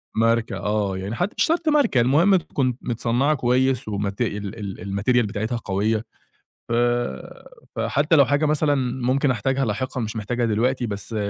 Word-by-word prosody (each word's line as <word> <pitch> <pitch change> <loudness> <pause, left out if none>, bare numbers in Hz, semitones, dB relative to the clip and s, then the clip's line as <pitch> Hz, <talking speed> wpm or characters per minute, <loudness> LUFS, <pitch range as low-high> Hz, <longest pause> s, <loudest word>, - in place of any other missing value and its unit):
ماركة، 115 0 +1
آه 105 -2 -1
يعني 100 +5 -4
حتى 180 - -2
مش - - +3
شرْط 330 -1 +1
ماركة، 265 - +3
المهم 160 +11 +4
تكون 130 -7 -1
متصنّعة 120 +5 0
كويس 130 -1 +1
ومت 100 +1 -3
ال 105 -2 -4
ال 100 +1 -4
الmaterial 120 -2 +3
بتاعتها 110 +3 -3
قوية، 105 +2 -1 0.7
ف - - -3 1.0
فحتى 150 +3 +2
لو 140 - +7
حاجة 145 +2 +1
مثلًا 150 -1 +2 0.3
ممكن 135 +2 +2
أحتاجها 130 +4 0
لاحقًا 125 +4 -3
مش 110 0 -4
محتاجها 120 +3 -1
دلوقتي 120 +3 0
بس 105 +2 -5
120 Hz, 155 wpm, -23 LUFS, 105-135 Hz, 1.0 s, لو